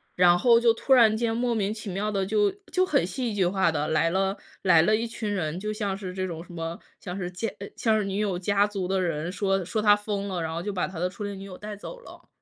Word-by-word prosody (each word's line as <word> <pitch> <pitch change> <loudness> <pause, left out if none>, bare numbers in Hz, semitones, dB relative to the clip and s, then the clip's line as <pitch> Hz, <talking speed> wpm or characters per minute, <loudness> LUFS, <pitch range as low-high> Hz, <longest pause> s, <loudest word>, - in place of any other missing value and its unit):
然 175 -1 +6
后 235 +3 +5
就 235 -1 +4
突 265 +4 +1
然 225 -4 +6
间 225 0 0
莫 240 0 0
名 205 -2 0
其 215 -1 -7
妙 205 +3 -2
地 195 -2 0
就 210 0 +2 0.2
就 370 0 +3
很 280 - +2
戏 230 +4 -3
剧 195 -3 +2
化 180 -2 +2
地 150 -1 -1
来 160 +1 +2
了 195 +2 0 0.3
来 175 -4 +6
了 215 +6 +3
一 230 +2 -1
群 220 -2 -4
人， 175 -3 -2
就 210 +2 -3
像 205 -2 -2
是 190 -2 -6
这 185 0 -2
种 165 -1 -6
什 - - -15
么 165 0 -5 0.2
像 180 - -6
是 180 -2 -3
家 185 +6 -3
呃， 200 - -6
像 220 -2 +2
是 - - 0
女 195 0 -3
友 205 -4 0
家 200 +2 +2
族 195 -3 -3
的 190 0 0
人， 165 -1 -2
说 195 0 0
说 200 +5 -2
她 210 -1 +6
疯 205 -1 -3
了， 185 -3 -3
然 160 0 -3
后 170 - -3
就 205 +1 -3
把 180 - -1
他 180 -3 -8
的 180 - +1
初 200 +3 -8
恋 200 -1 -5
女 195 - -8
友 185 -2 -9
带 210 0 -7
走 - - -9
了。 - - -14
195 Hz, 300 characters per minute, -26 LUFS, 180-215 Hz, 0.3 s, 然